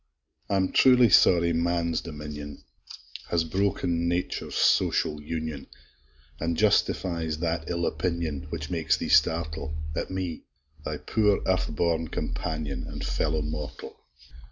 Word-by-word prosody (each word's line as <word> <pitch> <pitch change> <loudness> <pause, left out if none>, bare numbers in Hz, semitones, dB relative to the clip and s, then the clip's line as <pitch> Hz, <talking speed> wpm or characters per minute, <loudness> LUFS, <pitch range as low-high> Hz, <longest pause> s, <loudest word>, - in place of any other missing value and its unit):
I'm 95 -2 +1
truly 125 -3 +6
sorry 85 -3 +5
man's 85 0 0
dominion 75 -2 -8 0.7
Has 85 -1 +2
broken 85 -1 0
nature's 85 +1 -2
social 75 -1 +2
union, 80 -2 -5 0.7
An' 85 0 -1
justifies 85 -4 +1
that 80 0 -2
ill 85 -1 -1
opinion, 85 -5 -2
Which 75 -1 -5
makes 85 -2 +1
thee - - -4
startle 80 0 +2 0.2
At - - -2
me, 95 -3 -4 0.4
thy - - -3
poor 105 -2 +1
earth 95 0 +1
born 80 0 +1
companion, 75 -4 -4
An' - - -7
fellow 80 0 -1
mortal! 75 0 -6
85 Hz, 120 wpm, -27 LUFS, 75-85 Hz, 0.7 s, truly